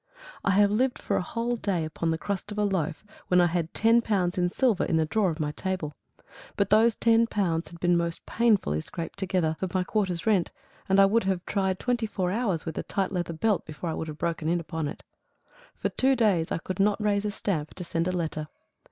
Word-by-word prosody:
I - - +1
have 205 0 +5
lived 245 +4 +1
for - - -2
a - - +1
whole 235 +5 -2
day 185 -7 -1
upon 160 +1 -2
the 160 - +1
crust 200 +3 -4
of 210 - -6
a 210 - +2
loaf, 180 -5 -1 0.2
when 180 - +4
I 175 - +6
had 170 -1 -1
ten 230 +2 +4
pounds 190 -5 0
in 180 -2 +1
silver 230 0 +2
in 165 - +1
the 160 - +2
drawer 195 +4 +1
of 160 0 -4
my 150 -1 -1
table. 180 -3 -3 0.6
But 200 -1 +1
those 220 +2 +5
ten 230 0 +4
pounds 175 -7 -1
had 170 +1 -12
been 175 +1 +3
most 170 -1 -1
painfully 210 - +2
scraped 165 - -6
together 180 -5 0
for 190 - -1
my 185 - +2
quarter's 185 -4 -1
rent, 205 -6 +2 0.4
and 195 +1 +4
I 195 - +8
would 215 +2 +2
have 190 -2 -1
tried 190 -2 0
twenty 240 -1 -1
four 185 -4 -1
hours 200 -6 -1
with 160 - -4
a - - 0
tight 195 -2 -2
leather 175 -3 -2
belt 200 +4 +1
before 160 +2 -5
I - - -2
would 160 - -4
have 150 -1 -7
broken 165 -1 -2
in 175 +1 +2
upon 160 -2 -3
it. - - -8 0.7
For - - -2
two 265 +1 +2
days 200 -9 +2
I - - +1
could 185 +4 -6
not 205 +2 +3
raise 210 -1 +1
a - - +1
stamp 170 -7 -3
to 180 - -5
send 165 0 -1
a - - +1
letter. 160 -4 -3
185 Hz, 235 wpm, -27 LUFS, 165-210 Hz, 0.7 s, I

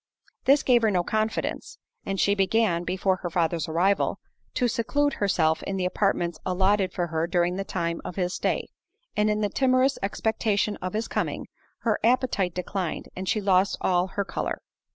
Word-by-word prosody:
This 275 +1 +5
gave 245 -2 +4
her 220 - +3
no 180 -3 +1
confidence; 220 +3 -2 0.3
and 195 -1 -2
she 200 - +3
began, 195 -3 +2
before 185 +1 0
her 175 - -4
father's 165 -2 0
arrival, 185 +5 +2 0.4
to 245 - +2
seclude 285 +6 +1
herself 160 -5 +2
in 195 - -3
the 185 - 0
apartments 180 -3 0
allotted 190 +1 +2
for 175 - -1
her 165 0 -1
during 175 0 +1
the 195 - -2
time 170 -3 -2
of - - -6
his 180 -1 -1
stay; - - -1 0.5
and 210 0 +2
in 210 0 0
the 205 - +1
timorous 260 +3 +2
expectation 210 0 0
of 185 +2 -5
his 220 +2 -1
coming, - - -2 0.4
her 225 -3 +1
appetite 230 -7 +2
declined, 180 -1 -3
and 185 0 -4
she 215 - +2
lost 195 -1 +3
all 180 0 +2
her 200 +1 -3
colour. - - -3
195 Hz, 175 wpm, -26 LUFS, 180-215 Hz, 0.5 s, This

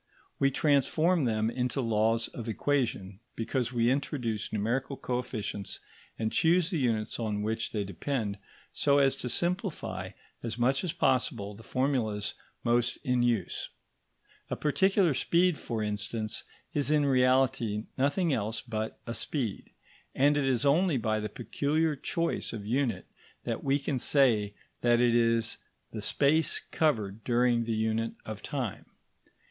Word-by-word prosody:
We 135 - +4
transform 155 +4 +2
them 110 -1 +1
into 125 +2 -1
laws 115 -1 +2
of 115 -1 -6
equation, 110 -7 -1 0.2
because 120 +1 -1
we 120 -1 +2
introduce 125 -6 -2
numerical 125 +6 -1
coefficients 115 -5 -3 0.4
and 110 -1 -1
choose 175 +2 +3
the 170 - 0
units 115 -4 0
on 105 -2 -1
which 110 +1 -1
they 105 -2 -1
depend 100 - -3 0.3
so 140 -1 +3
as 135 -1 +4
to 125 - -3
simplify 180 - -1 0.3
as 115 -1 -4
much 130 +5 +2
as 180 - -1
possible 120 -8 0
the 105 - -12
formulas 115 -5 -1 0.3
most 120 0 +2
in 125 -1 +1
use. 120 -6 0 0.8
A - - -1
particular 190 +2 +3
speed, 170 +6 +2
for 115 -3 -3
instance, 105 +1 -3 0.3
is 145 -1 0
in 150 -1 +3
reality 130 -5 +2
nothing 145 +5 +1
else 110 -1 -1
but 110 -2 -4
a 115 - -4
speed, 115 -3 -3 0.5
and 145 +2 +4
it 145 -2 +1
is 130 -1 +1
only 160 +2 +3
by 110 -2 0
the 105 0 -3
peculiar 150 +7 0
choice 165 +2 -2
of 105 -3 -6
unit 120 -3 0 0.4
that - - -3
we 135 +1 +3
can 135 -2 -2
say 115 -8 +2 0.3
that 120 -1 +4
it 120 -1 +4
is 115 -1 +2 0.3
the 110 - -5
space 145 +8 +2
covered 110 -9 -1
during 120 0 +2
the 115 -1 -1
unit 110 +1 0
of 110 -1 -6
time. 130 - -4
120 Hz, 145 wpm, -29 LUFS, 110-140 Hz, 0.8 s, We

